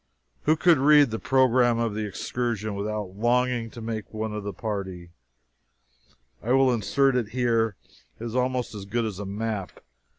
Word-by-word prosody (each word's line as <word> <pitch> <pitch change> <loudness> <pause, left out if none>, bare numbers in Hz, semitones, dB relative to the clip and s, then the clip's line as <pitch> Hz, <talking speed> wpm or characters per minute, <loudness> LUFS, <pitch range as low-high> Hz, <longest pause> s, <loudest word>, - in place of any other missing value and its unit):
Who 155 - +4
could 170 -3 +4
read 145 -2 +6
the 110 - -3
program 125 -2 +3
of 115 -2 0
the 105 0 -3
excursion 110 0 -3
without 100 -1 -4
longing 120 +1 +1
to 115 - -10
make 110 -1 -5
one 110 0 -4
of 105 - -4
the 100 - -4
party? 95 -5 -5 1.3
I 120 +3 0
will 135 -1 +4
insert 125 +5 +2
it 120 -4 0
here. 115 -3 +1 0.4
It 115 - -6
is 115 0 -5
almost 125 -1 0
as 100 -2 -7
good 115 +3 -1
as 105 -3 -5
a 100 - -5
map. 105 -1 -4
115 Hz, 170 wpm, -26 LUFS, 105-125 Hz, 1.3 s, read